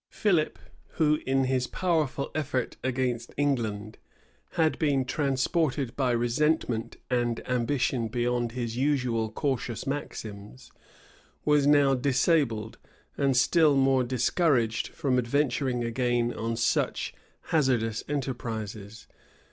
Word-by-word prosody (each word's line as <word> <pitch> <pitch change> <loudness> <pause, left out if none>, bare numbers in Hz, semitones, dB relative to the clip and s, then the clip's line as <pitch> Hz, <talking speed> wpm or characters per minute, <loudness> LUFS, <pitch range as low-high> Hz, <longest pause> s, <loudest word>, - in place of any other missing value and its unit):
Philip, 175 -7 +1 0.4
who, 150 -1 +2
in 135 0 +2
his 130 -1 0
powerful 155 -7 -1
effort 140 -5 -2
against 125 -2 -2
England, 110 -7 -1 0.5
had 160 -2 +1
been 140 -4 +2
transported 135 -1 0
by 130 -3 +1
resentment 120 -1 0
and 120 -2 -1
ambition 125 -1 0
beyond 120 0 -1
his 120 -2 -3
usual 125 -5 0
cautious 125 -3 -2
maxims, 110 -5 -6 0.7
was 150 -1 +4
now 145 -2 +5
disabled, 130 -4 +1 0.4
and 135 -2 +1
still 155 +3 +4
more 135 -1 +3
discouraged, 125 -1 +1
from 130 -3 0
adventuring 125 0 0
again 120 0 0
on 115 +1 -3
such 115 - 0 0.4
hazardous 120 -8 +1
enterprises. 110 -6 -4
125 Hz, 105 wpm, -27 LUFS, 115-145 Hz, 0.7 s, now